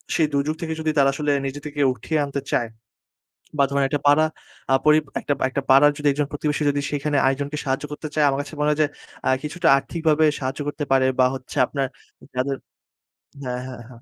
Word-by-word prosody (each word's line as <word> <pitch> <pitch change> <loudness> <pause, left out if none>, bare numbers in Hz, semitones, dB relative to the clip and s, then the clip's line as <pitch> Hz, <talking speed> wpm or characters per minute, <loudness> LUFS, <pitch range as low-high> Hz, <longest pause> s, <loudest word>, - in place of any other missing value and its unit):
সেই 160 - +3
দুর্যোগ 140 +2 0
থেকে 160 -1 -2
যদি 160 0 0
তারা 135 -1 +5
আসলে 145 +1 -1
নিজে 135 +1 -4
থেকে 150 0 -6
উঠিয়ে 150 +7 -2
আনতে 140 0 -4
চায় 120 -2 +1 0.9
বা 140 - +6
ধরেন 140 0 +2
একটা 145 0 -1
পাড়া 145 +2 +5 0.5
আ - - +5
পরি 150 0 +6 0.2
একটা, - - -1 0.2
একটা 140 - -2
পাড়ার 140 +2 +7
যদি 145 0 +1
একজন 145 +1 -1
প্রতিবেশী 150 +1 -1
যদি 145 0 -1
সেখানে 145 0 -1
আরেকজনকে 140 +2 -1
সাহায্য 135 +1 -1
করতে 155 +1 -5
চায়, 150 -1 +3
আমার 135 0 0
কাছে 145 - -10
মনে 150 - +2
হয় 150 - 0
যে, - - +4 0.4
আ - - +4
কিছুটা 165 +3 0
আর্থিকভাবে 160 +1 +1
সাহায্য 135 +2 -4
করতে 145 0 -3
পারে 130 -1 +4
বা 130 - +6
হচ্ছে 130 +2 -9
আপনার 135 0 -2 0.5
যাদের 135 +2 0 0.9
হ্যাঁ, 125 0 -3
হ্যাঁ, 125 -2 -8
হ্যাঁ। 120 -2 -14
145 Hz, 200 wpm, -23 LUFS, 135-150 Hz, 0.9 s, পাড়ার